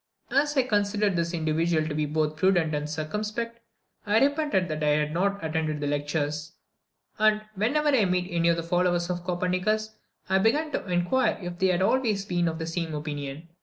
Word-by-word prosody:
As 290 +1 +2
I 265 - +5
considered 205 -3 +1
this 170 0 0
individual 160 -1 0
to 155 - -3
be 150 0 -1
both 155 0 0
prudent 175 -3 +2
and 150 0 -2
circumspect, 215 +9 -3 0.4
I 210 0 +2
repented 285 - +2
that 155 0 -3
I - - +2
had 150 0 0
not 200 +1 0
attended 155 -1 -1
the 145 - -2
lectures; 145 +1 -2 0.7
and, 215 0 +3
whenever 280 +10 +1
I 255 -8 +4
met 180 -1 +1
any 170 -2 +1
of 170 - +2
the 165 - -2
followers 175 0 +1
of 175 -1 -4
Copernicus, 185 +5 0 0.4
I 190 +1 +3
began 295 +10 +2
to - - -3
inquire 180 +9 +1
if 175 -2 -7
they 190 - +3
had 180 0 +2
always 215 -3 +1
been 175 -3 0
of 160 -1 -2
the 160 - -4
same 165 -1 -3
opinion. 145 +1 -5
175 Hz, 190 wpm, -26 LUFS, 155-210 Hz, 0.7 s, I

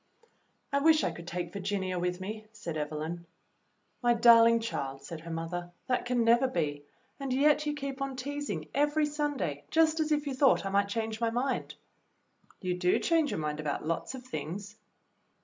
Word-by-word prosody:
"I 280 - +4
wish 310 +1 +5
I - - +1
could 170 0 -10
take 175 0 -4
Virginia 190 -2 -2
with 180 +1 -1
me," 215 +3 -6
said 175 -7 -6
Evelyn. 155 +3 -4 0.7
"My 240 -1 +4
darling 230 0 +7
child," 135 -12 -4
said 155 +2 -7
her 170 - -9
mother, 165 +2 -4 0.2
*'that 250 -1 0
can 245 -1 +1
never 235 +3 +5
be, 145 - -2 0.3
and 275 -1 -3
yet 300 +3 +3
you 295 - 0
keep 275 -1 -5
on 275 -1 -2
teasing 285 +3 -4
every 295 +2 +2
Sunday 290 - -2
just 320 0 +3
as 310 -1 0
if 295 -1 +2
you 280 - -2
thought 260 -5 +4
I - - -1
might 200 0 +2
change 220 +1 -3
my 230 - +2
mind." 250 +4 -2 0.9
"You 180 -2 -1
do 180 0 +3
change 325 -3 +2
your - - -2
mind 150 -1 -2
about 150 -1 -3
lots 165 +10 -2
of 255 - -9
things." 205 -3 -6
225 Hz, 185 wpm, -30 LUFS, 175-275 Hz, 0.9 s, darling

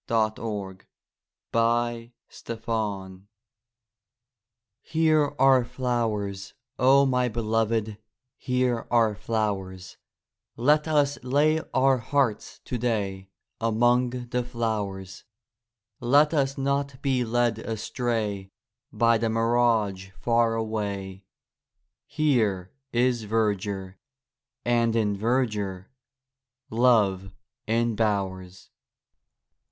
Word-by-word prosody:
33 110 -1 0 1.1
WATER 115 0 +1 0.4
AND 115 -1 -4
FLOWERS 100 -5 -3 1.6
Here 155 -2 +1
are 130 -1 +5
flowers, 110 -6 -3 0.2
O 135 +2 +5
my 125 -2 +1
Beloved, 110 -1 -1 0.4
Here 125 -2 -1
are 115 -3 +3
flowers; 100 -4 -3 0.6
Let 150 +6 +3
us 145 -3 +1
lay 150 +5 +2
our 130 0 +3
hearts 125 -2 -1
today 105 -6 -2 0.3
Among 120 +2 +2
the 125 0 -3
flowers; 105 -6 -4 0.8
Let 145 +5 +4
us 135 -3 0
not 140 0 -1
be 130 -3 +1
led 120 -1 0
astray 110 -3 -3 0.4
By 115 -4 +3
the 115 0 0
mirage 115 -4 +1
far 115 -1 +2
away; 100 -4 -4 0.8
Here 110 - 0 0.2
is 120 -1 +1
verdure, 100 -3 -2 0.7
and 120 -1 +2
in 105 -3 +1
verdure 105 -4 -1 0.8
Love 105 -6 +2 0.4
embowers. 100 -5 -1
115 Hz, 85 wpm, -26 LUFS, 105-125 Hz, 1.6 s, are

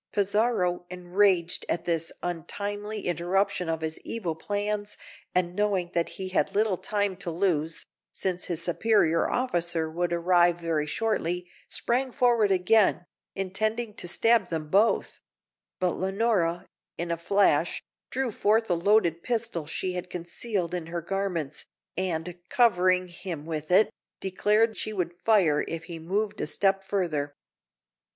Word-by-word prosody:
Pizarro, 200 -3 +1
enraged 180 0 +1
at 170 - -1
this 165 -1 -1
untimely 205 +5 -4
interruption 180 +1 0
of 160 0 -1
his 160 0 -4
evil 195 -8 -3
plans, 205 +4 -3 0.4
and 180 -1 +1
knowing 195 -4 0
that 170 -1 0
he 190 -1 -4
had 185 - 0
little 210 -2 +3
time 200 0 0
to 185 - -4
lose, 165 -2 0 0.3
since 180 -2 -2
his 170 -3 -3
superior 170 -2 +2
officer 170 -9 0
would 175 +2 -1
arrive 175 0 +3
very 160 -3 -1
shortly, 180 -2 -1 0.2
sprang 255 +2 0
forward 240 -5 +3
again, 185 -1 +3 0.3
intending 215 +4 -1
to 175 - -7
stab 225 +2 +3
them 155 -2 -3
both; 205 +7 +2 0.6
but 180 -1 +2
Leonora, 190 -3 0 0.3
in 170 0 -3
a - - +1
flash, 195 +4 +2 0.3
drew 265 -3 -1
forth 215 0 +2
a - - +5
loaded 170 -2 +3
pistol 225 -9 -2
she 185 +4 -2
had 180 0 -5
concealed 180 +1 -3
in 175 -3 -3
her 170 0 -3
garments, 170 -6 -2 0.3
and, 175 -1 -3
covering 185 -6 +3
him 175 -3 -7
with 155 -2 -4
it, 190 +4 +5 0.3
declared 210 +4 +2
she 215 - -3
would 175 -3 -3
fire 185 -10 +4
if 165 -1 -4
he 165 0 -7
moved 205 +5 -2
a - - -1
step 195 -1 +2
further. 165 -8 -1
180 Hz, 140 wpm, -27 LUFS, 170-205 Hz, 0.6 s, a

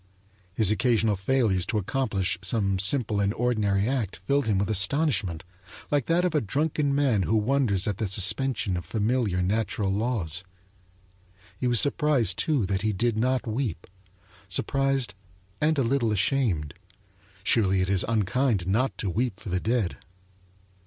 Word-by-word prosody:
His 110 -3 +3
occasional 110 -2 +2
failures 100 -2 +1
to 115 - -1
accomplish 100 -4 -1
some 100 0 0
simple 105 0 +2
and 100 0 +1
ordinary 105 -4 +1
act 120 -7 -2
filled 140 +10 -1
him 105 -3 +2
with 100 0 0
astonishment, 100 - +1 0.5
like 145 -5 +1
that 175 +2 +2
of 180 - 0
a 150 - +2
drunken 145 +5 0
man 135 -8 +2
who 105 +4 0
wonders 110 -4 +1
at 100 -2 -2
the 110 - -1
suspension 100 +2 +1
of 85 - -4
familiar 105 0 0
natural 100 0 -1
laws. 100 -6 -2 1.1
He 125 - -2
was 120 -2 +3
surprised, 140 -9 +2
too, 145 -9 +1
that 95 0 -1
he 110 +1 0
did 115 +3 0
not 130 +4 0
weep 110 - -3 0.6
surprised 135 -5 0 0.5
and 155 +1 +2
a 135 - +2
little 120 -2 +1
ashamed; 100 - 0 0.7
surely 95 -3 +2
it 95 - 0
is 95 -2 +2
unkind 110 -1 0
not 115 +8 0
to 105 - -3
weep 105 +2 -2
for 105 - -8
the 95 0 0
dead. 110 -3 -1
110 Hz, 150 wpm, -26 LUFS, 95-130 Hz, 1.1 s, His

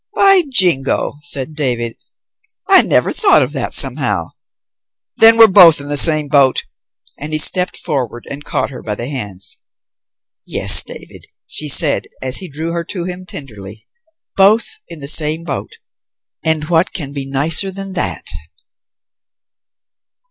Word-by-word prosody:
"By 390 -1 +5
Jingo," 175 - 0
said 145 0 -1
David, 120 -6 -2 0.7
"I 385 -1 +6
never - - 0
thought 405 -3 +3
of - - -5
that, - - -4
somehow. - - 0 0.9
Then 225 0 +6
we're 225 - +9
both 185 -7 +6
in 140 +1 -7
the 145 - -1
same 155 0 +2
boat!" 140 -3 +2 0.6
And 150 +2 -7
he - - +1
stepped 180 +4 +2
forward 125 -7 -5
and 140 +1 -8
caught - - -3
her 130 - -10
by 105 - -4
the 120 - -6
hands. 105 -9 -5 0.8
"Yes, - - +5
David," - - -11 0.2
she 150 - -4
said, 145 +1 +4
as 130 0 +1
he 185 - -8
drew 160 +4 -5
her 170 0 -4
to 180 -1 -5
him 180 +1 -7
tenderly, 110 - -11 0.5
"both 205 +4 +2
in 165 -3 -10
the 140 - -6
same 155 +1 +2
boat. 145 -5 -6 0.7
And 160 -1 -1
what 170 +2 0
can 145 -7 -6
be 140 -1 -6
nicer 160 +8 +1
than 195 0 -9
that?" - - -4
155 Hz, 150 wpm, -15 LUFS, 135-180 Hz, 0.9 s, we're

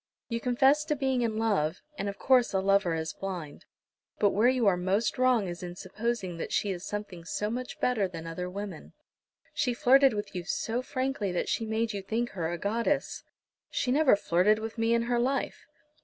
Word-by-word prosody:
You 230 -1 -1
confess 265 +5 +3
to 305 -1 0
being 265 -2 0
in 225 -2 -1
love, 200 -7 0
and 200 -8 -3
of 200 - -7
course 255 -2 +3
a 190 - +2
lover 195 -3 +2
is 160 -1 -3
blind. 180 -7 -6 0.5
But 205 -2 +3
where 220 +5 +4
you 255 -3 +1
are 195 -3 +5
most 195 +8 0
wrong 250 -6 +3
is 175 -1 -6
in 175 -1 -6
supposing 190 -1 -3
that - - -5
she 205 - +1
is 180 -1 -5
something 205 -5 -5
so 210 +5 -2
much 250 +2 -5
better 225 -6 +1
than 165 -2 -8
other 180 +2 -4
women. 195 -3 -7 0.6
She 245 -3 0
flirted 270 -1 +5
with 205 -1 -4
you 180 -2 -4
so 225 +6 -2
frankly 255 -6 -2
that 180 - -1
she 225 - -1
made 220 0 -1
you 200 - -3
think 230 +5 -2
her 170 -3 -3
a 175 - -3
goddess." 220 +6 -1 0.5
"She 250 - -1
never 285 -3 +5
flirted 200 +2 +3
with 220 0 -5
me 230 0 +2
in 230 - +1
her 240 0 0
life." 265 +3 -1
215 Hz, 200 wpm, -29 LUFS, 185-245 Hz, 0.6 s, are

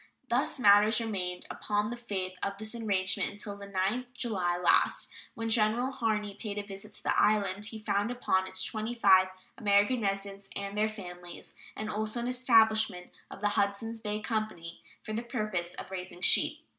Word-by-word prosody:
Thus 255 +5 +1
matters 210 -1 +6
remained 185 -6 -2
upon 210 +1 -1
the - - -3
faith 200 -6 -3
of 200 0 -2
this 215 +1 -2
arrangement 195 -5 0
until 205 0 -6
the 200 0 -10
9th 200 +6 -1
July 190 -8 -1
last, 175 -1 +3 0.2
when 225 0 -3
General 230 +4 +2
Harney 215 -5 -1
paid 205 0 -6
a 205 - -2
visit 200 +1 -10
to - - -7
the - - +2
island. 205 -1 +2
He 225 - -6
found 205 0 0
upon 190 -6 0
it 190 0 -6
twenty 220 +2 -3
five 190 -4 +6 0.3
American 205 +4 +3
residents 195 -1 -3
with 200 0 -4
their 210 +1 +1
families, 180 -4 -9 0.2
and 215 - -4
also 215 +2 -2
an 235 - -2
establishment 220 -6 +3 0.2
of - - -10
the 205 - +2
Hudsons 205 +3 -1
Bay 210 -1 -2
Company 215 -8 -4 0.2
for 215 - -5
the 225 - -1
purpose 215 -8 -3
of - - -8
raising 180 -1 -6
sheep. - - +3
210 Hz, 175 wpm, -30 LUFS, 195-225 Hz, 0.3 s, matters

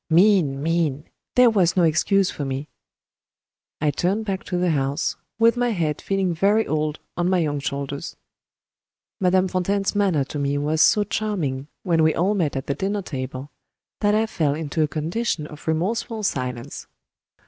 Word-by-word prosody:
Mean! 165 -6 +4
mean! 160 -3 0 0.3
there 250 -2 +6
was 185 -4 +2
no 180 - +5
excuse 185 +4 +3
for 145 - -5
me. 135 +2 -3 1.1
I 150 -1 +2
turned 190 +9 -1
back 195 -2 -3
to 180 - -2
the 175 -1 +2
house, 140 +1 0 0.2
with 230 +1 +4
my 245 0 +1
head 160 -8 -1
feeling 195 -2 0
very 205 +6 +2
old 155 -1 -1 0.2
on 175 +1 0
my 185 - +3
young 150 -4 0
shoulders. 140 +2 -4 1.0
Madame 185 0 +3
Fontaine's 195 +2 0
manner 195 -8 +2
to 145 +2 -6
me 140 0 0
was 150 +2 +1
so 210 - +5
charming, 180 -11 -2 0.2
when 165 -3 +2
we 155 0 +3
all 190 +5 +2
met 170 -9 0
at 135 - -3
the 140 - -1
dinner 200 +5 -2
table, 130 -1 -6 0.5
that 205 0 +2
I 220 +1 +3
fell 155 -9 0
into 160 0 -2
a 155 - +3
condition 160 +2 -2
of 150 +1 -12
remorseful 210 +7 -1
silence. 125 -8 -3
165 Hz, 170 wpm, -23 LUFS, 145-195 Hz, 1.1 s, there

